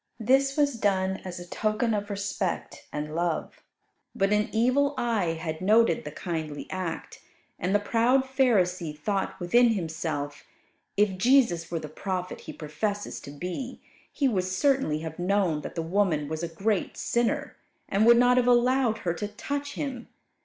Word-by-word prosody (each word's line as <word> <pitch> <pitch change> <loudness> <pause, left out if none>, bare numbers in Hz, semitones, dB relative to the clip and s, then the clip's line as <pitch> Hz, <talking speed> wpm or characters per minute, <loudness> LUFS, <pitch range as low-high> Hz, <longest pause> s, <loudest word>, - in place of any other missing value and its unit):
This 270 +5 +3
was 285 -5 +2
done 190 -2 +1
as 180 -1 -6
a 175 - -8
token 215 +4 0
of 205 0 -2
respect 200 -2 -3
and 150 +1 -4
love. 170 0 -2 0.5
But 195 +1 +2
an 210 0 +1
evil 260 +6 +2
eye 215 -8 +1
had 160 0 -5
noted 230 +4 +3
the - - -5
kindly 160 -5 -4
act; 185 -3 -5 0.4
and 185 +3 0
the - - +5
proud 235 +5 +3
Pharisee 185 - +1
thought 195 +6 -2
within 230 +7 +4
himself, 160 -5 -3 0.5
if 200 -2 +2
Jesus 230 -9 +3
were 170 - -2
the 155 - -5
prophet 180 +3 -4
He - - -2
professes 200 +7 -3
to - - -10
be, 180 - -5 0.3
He 280 - +1
would 190 -7 +1
certainly 185 - +1
have 160 +1 -6
known 180 -4 +1
that - - -7
the 165 - -2
woman 165 -4 +1
was 160 +1 -4
a 170 - -1
great 195 +4 -1
sinner, 235 -1 0 0.3
and 200 +2 +2
would 235 0 +8
not 245 +1 +5
have 250 -1 +3
allowed 245 -1 +3
her 170 - +1
to 205 +4 -4
touch 285 +7 -4
Him. 260 -4 -4
200 Hz, 165 wpm, -27 LUFS, 170-240 Hz, 0.5 s, would